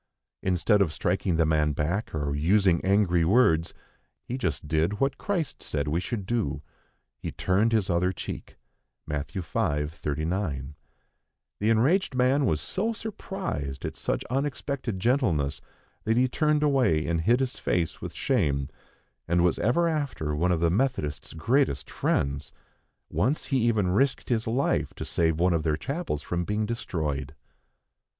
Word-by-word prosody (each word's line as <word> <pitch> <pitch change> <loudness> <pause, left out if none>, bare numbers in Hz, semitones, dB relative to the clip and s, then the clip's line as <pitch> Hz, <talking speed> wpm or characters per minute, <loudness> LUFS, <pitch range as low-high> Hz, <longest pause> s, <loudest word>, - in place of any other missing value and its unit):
Instead 95 +3 +2
of 90 -6 +2
striking 90 +2 0
the 80 0 +3
man 75 -1 +2
back 85 +9 -1
or 70 -2 -1
using 90 +3 +3
angry 95 -3 +3
words, 85 -4 +4 0.5
he 125 - -4
just 80 - -2
did 80 +6 +1
what 135 +1 0
Christ 185 -8 -2
said 75 0 -2
we 80 +3 +1
should 100 +2 -4
do, 110 -9 -1 0.6
he - - -4
turned 100 +5 +1
his 110 -4 +2
other 90 +1 +2
cheek 95 - -7 0.5
(Matt. 75 -1 -3
v. - - -2 0.5
39). 75 -1 -3 0.9
The 105 - +1
enraged 130 - +3
man 130 +2 +3
was 75 - +1
so 210 - -1
surprised 190 - -5
at - - -4
such - - -2
unexpected 135 -4 -2
gentleness, 95 - +1 0.4
that 110 +1 +2
he 130 +1 +4
turned 150 +3 +1
away 125 - +3
and 85 +1 0
hid 120 +9 +3
his 130 -1 -1
face 85 -3 -1
with - - -6
shame, 70 -1 +1 0.6
and 85 +1 +3
was 90 - +2
ever 170 +10 +2
after 140 - -1
one 90 +4 +1
of 85 -2 +1
the 85 -1 +3
Methodists' 90 - -1
greatest 115 - +1
friends. 70 +1 -1 0.6
Once 135 +8 +1
he 135 -2 +1
even 105 -5 +2
risked 135 +8 +1
his 115 -2 0
life 125 +5 0
to - - -5
save 80 -1 +1
one 90 +1 +3
of 80 - +1
their 75 -1 0
chapels 140 - -3
from 85 0 -2
being 105 +4 -1
destroyed. 75 - -3
95 Hz, 155 wpm, -27 LUFS, 80-125 Hz, 0.9 s, words